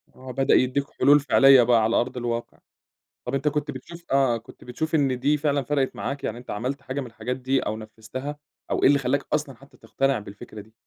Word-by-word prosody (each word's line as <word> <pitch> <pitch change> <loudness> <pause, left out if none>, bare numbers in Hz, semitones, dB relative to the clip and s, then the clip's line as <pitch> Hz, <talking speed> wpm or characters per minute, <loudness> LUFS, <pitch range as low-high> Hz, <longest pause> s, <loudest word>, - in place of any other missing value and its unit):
آه 130 0 -9
بدأ 135 +1 +2
يدّيك 130 +2 +3 0.2
حلول 145 +2 +6
فِعلية 135 -2 +6
بقى 115 -1 +4
على 115 +2 +1
أرض 130 +1 0
الواقع. 120 -1 -4 0.7
طَب 125 - -4
أنت 140 +2 -1
كنت 150 0 -1
بتشوف 170 +6 -11
آآ، 135 -3 +3
كنت 115 - -15
بتشوف 160 +6 -3
إن 135 -4 +1
دي 145 +4 +2
فعلًا 145 -1 0
فرقِت 135 0 -1
معاك، 140 0 -4
يعني 110 - -3
أنت 120 - -13
عملت 130 +6 -3
حاجة 140 0 -4
من 130 - -6
الحاجات 125 +2 -5
دي 130 +1 0
أو 110 - -3
نفّذتها 115 +6 -7 0.3
أو - - 0
إيه - - +8
اللي 140 +1 +4
خلّاك 135 +1 0
أصلًا 145 -3 -1
حتى 140 +4 -19
تقتنع 135 -2 -1
بالفكرة 105 +1 -10
دي؟ 110 +2 -20
130 Hz, 215 wpm, -24 LUFS, 120-140 Hz, 0.7 s, إيه